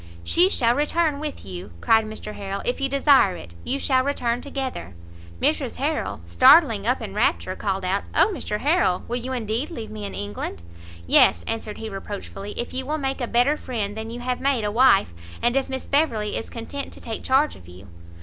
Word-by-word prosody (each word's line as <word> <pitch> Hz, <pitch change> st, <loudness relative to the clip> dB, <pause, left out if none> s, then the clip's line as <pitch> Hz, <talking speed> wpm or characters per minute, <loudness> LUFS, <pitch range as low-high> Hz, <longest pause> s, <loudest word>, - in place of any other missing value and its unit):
"She 355 Hz, -, +4 dB
shall 235 Hz, -9 st, +3 dB
return 300 Hz, +2 st, +1 dB
with 300 Hz, -, -5 dB
you," 90 Hz, -2 st, -8 dB
cried 225 Hz, -, +4 dB
Mr 215 Hz, -1 st, -7 dB
Harrel, 195 Hz, -1 st, -5 dB
"if 245 Hz, +2 st, -1 dB
you 275 Hz, -, +1 dB
desire 275 Hz, -8 st, +4 dB
it; 85 Hz, -, -11 dB
you 270 Hz, -, -1 dB
shall 260 Hz, -2 st, +2 dB
return 245 Hz, -3 st, -1 dB
together." 265 Hz, -, -5 dB, 0.4 s
Mrs -, -, 0 dB
Harrel, -, -, -2 dB
starting 85 Hz, 0 st, +5 dB
up -, -, +1 dB
in -, -, -6 dB
rapture, 85 Hz, +1 st, 0 dB
called 195 Hz, -2 st, -2 dB
out 195 Hz, +2 st, 0 dB
"Oh -, -, +5 dB
Mr 210 Hz, -, -4 dB
Harrel, 290 Hz, -, +2 dB
will 240 Hz, -, -1 dB
you 250 Hz, +2 st, -5 dB
indeed 235 Hz, +2 st, -2 dB
leave 230 Hz, -10 st, -7 dB
me 215 Hz, -1 st, -7 dB
in 200 Hz, -, -6 dB
England?" 100 Hz, -5 st, -5 dB, 0.4 s
"Yes," 85 Hz, 0 st, +5 dB
answered 225 Hz, -2 st, -4 dB
he 225 Hz, -, -6 dB
reproachfully, 200 Hz, 0 st, -7 dB
"if 240 Hz, -, -3 dB
you 260 Hz, +1 st, -2 dB
will 300 Hz, +4 st, -2 dB
make 270 Hz, -2 st, -2 dB
a 245 Hz, -, -1 dB
better 245 Hz, +6 st, +3 dB
friend 215 Hz, -7 st, -4 dB
than 220 Hz, 0 st, -5 dB
you 240 Hz, +1 st, -6 dB
have 250 Hz, 0 st, -2 dB
made 270 Hz, -4 st, +1 dB
a 210 Hz, -, -1 dB
wife, 225 Hz, -, +4 dB, 0.3 s
and 240 Hz, +1 st, +1 dB
if 270 Hz, 0 st, 0 dB
Miss 265 Hz, 0 st, -4 dB
Beverley 235 Hz, -8 st, +1 dB
is -, -, -4 dB
content 260 Hz, +4 st, -6 dB
to -, -, -11 dB
take 225 Hz, -1 st, -6 dB
charge 270 Hz, +3 st, +2 dB
of 85 Hz, -, -15 dB
you." 90 Hz, +2 st, -13 dB
235 Hz, 205 wpm, -24 LUFS, 200-270 Hz, 0.4 s, starting